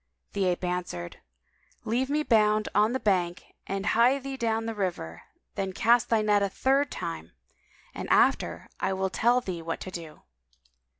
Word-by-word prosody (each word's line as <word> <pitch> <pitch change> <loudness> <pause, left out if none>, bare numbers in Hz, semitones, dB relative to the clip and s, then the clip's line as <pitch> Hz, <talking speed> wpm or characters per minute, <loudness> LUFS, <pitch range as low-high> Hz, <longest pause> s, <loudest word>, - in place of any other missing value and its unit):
The 200 -1 0
Ape 180 0 0
answered, 175 - -3 0.7
"Leave 250 +4 0
me 300 +1 +1
bound 215 -4 +3
on 210 +4 +3
the 260 - 0
bank 180 -5 -1
and 195 0 -3
hie 240 +6 +4
thee 275 0 -6
down 225 -3 -1
to - - -6
the 225 - -3
river; 175 - -4 0.3
then 190 -1 -3
cast 235 +4 +3
thy 225 -2 +3
net 205 -1 +3
a 200 - +1
third 275 +7 +1
time, 85 - -6 0.6
and - - -6
after - - +2
I 190 - 0
will 190 0 -1
tell 240 +5 +3
thee 180 -7 -5
what 165 0 -4
to 185 - -6
do." 165 -3 -9
205 Hz, 175 wpm, -27 LUFS, 180-235 Hz, 0.7 s, hie